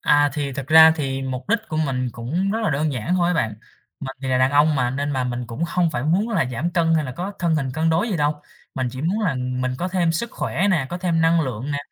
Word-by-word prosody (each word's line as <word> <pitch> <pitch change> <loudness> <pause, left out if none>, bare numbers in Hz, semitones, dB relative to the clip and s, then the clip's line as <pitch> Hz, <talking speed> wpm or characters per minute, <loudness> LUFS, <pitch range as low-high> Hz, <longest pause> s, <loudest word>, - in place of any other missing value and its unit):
À, 145 -1 +3
thì 145 -2 -3
thực 135 0 -5
ra 160 +1 +8
thì 135 -2 -2
mục 130 +4 -5
đích 230 +1 +3
của 155 - -3
mình 130 -5 -1
cũng 160 - -2
rất 220 +2 -1
là 210 - +1
đơn 145 +1 0
giản 125 +9 -2
thôi 175 -1 +2
á 180 - +1
bạn. 115 -9 0 0.5
Mình 135 -1 -6
thì 135 - -3
là 130 - +2
đàn 130 +1 +3
ông 145 +2 +4
mà, 125 -2 +1
nên 140 +2 -2
là 130 -1 -1
mình 120 -1 -3
cũng 120 +8 -6
hông 170 -1 +1
phải 120 -4 -3
muốn 185 +9 +1
là 195 -9 +1
giảm 155 +10 -2
cân 165 -2 +2
hay 155 -2 +1
là 130 - -5
có 180 +8 -5
thân 170 -2 +1
hình 135 -3 -1
cân 160 +1 +1
đối 175 +9 +1
gì 195 - -1
đâu. 150 -1 -1 0.3
Mình 130 -1 -1
chỉ 130 +3 -7
muốn 195 +7 0
là 175 -10 0
mình 125 0 -2
có 180 - -2
thêm 175 -3 +1
sức 230 +8 -3
khỏe 195 +4 -1
nè, 155 -8 +1
có 175 - -4
thêm 170 -3 0
năng 165 0 +4
lượng 130 0 -3
nè, 145 - -1
150 Hz, 285 wpm, -22 LUFS, 130-170 Hz, 0.5 s, ra